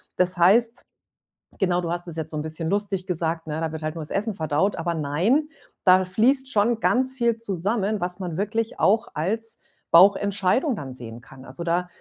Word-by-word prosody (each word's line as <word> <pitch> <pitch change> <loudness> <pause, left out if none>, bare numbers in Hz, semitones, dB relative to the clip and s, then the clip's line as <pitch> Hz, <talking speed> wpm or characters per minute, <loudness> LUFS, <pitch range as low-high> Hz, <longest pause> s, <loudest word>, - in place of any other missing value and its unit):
Das 180 0 +1
heißt 225 +7 +3 0.7
genau, 180 -2 +1
du 175 -2 -3
hast 175 +1 -3
das 170 -2 -8
jetzt 160 -1 -2
so 155 - -4
'n - - -2
bisschen 160 +1 -3
lustig 200 -1 -1
gesagt, 165 -2 -2
ne, 155 +1 -3
da 160 -1 -2
wird 160 0 -6
halt 155 +1 -4
nur 165 - -5
das 150 - -9
Essen 215 +2 -1
verdaut, 160 +3 0
aber 170 0 -2
nein, 170 - +1 0.4
da 185 0 +6
fließt 255 +9 +2
schon 220 +2 +1
ganz 260 +1 +2
viel 235 -3 0
zusammen, 205 0 -1
was 180 +1 -2
man 175 -4 -4
wirklich 220 +3 -2
auch 220 +3 +3
als 220 +9 -2 0.3
Bauchentscheidung 200 - +4
dann 135 -9 -7
sehen 120 -1 -9
kann. 130 +1 -15
Also, 140 +7 -7
da 175 +1 0
185 Hz, 195 wpm, -24 LUFS, 165-215 Hz, 0.7 s, da